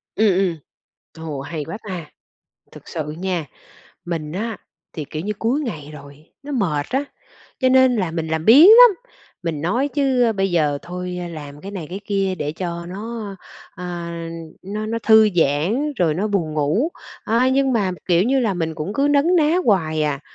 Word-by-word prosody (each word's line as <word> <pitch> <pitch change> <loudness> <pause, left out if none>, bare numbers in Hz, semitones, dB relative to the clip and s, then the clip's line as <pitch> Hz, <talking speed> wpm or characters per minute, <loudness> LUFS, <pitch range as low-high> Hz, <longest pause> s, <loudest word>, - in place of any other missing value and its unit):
Ừm, 220 - +3
ừm. 185 -4 +1 0.7
Ồ, 145 -3 -4
hay 155 +2 -5
quá 170 - -6
ta! 180 -4 -5 0.7
Thực - - -14
sự 150 -2 -4
nha, 180 -3 -2 0.6
mình 160 -3 -4
á 220 +4 -3 0.4
thì, 155 - -5
kiểu 155 - -4
như, 210 +3 -2
cuối 240 +7 0
ngày 155 - -5
rồi, 145 +1 -14
nó 290 +1 -7
mệt 160 - 0
á, 270 +3 0 0.6
cho 260 - +4
nên 260 -1 +5
là 185 -6 -1
mình 160 -1 -3
làm 160 0 -2
biếng 275 - +9
lắm, 480 +3 +10 0.5
mình 165 -4 -3
nói 245 - 0
chứ, 270 -3 +1
ơ, 230 - +2
bây 195 -2 0
giờ 150 -4 +1
thôi 180 +1 -6 0.2
làm 145 -3 -9
cái 195 - -8
này 185 -6 -6
cái 190 +2 -5
kia 195 -2 0
để 150 -4 -3
cho 170 0 -5
nó, 220 +4 -6 0.5
ơ, 180 - -7 0.8
nó 210 +3 -4
nó 230 +1 -2
thư 220 -1 +6
giãn 175 - +1
rồi 165 -6 +2
nó 190 +6 -1
buồn 190 -7 -1
ngủ. 155 - +1 0.4
A, 235 +4 +2
nhưng 265 0 +2
mà, 205 -6 +1 0.2
kiểu 175 0 +4
như 265 +5 +2
là, 220 -6 0
mình 160 -2 -2
cũng 155 +7 -4
cứ 275 - +2
nấn 290 +5 +3
ná 315 +1 +3
hoài 160 -7 +2
à, 145 -2 -1
190 Hz, 190 wpm, -21 LUFS, 160-235 Hz, 0.8 s, lắm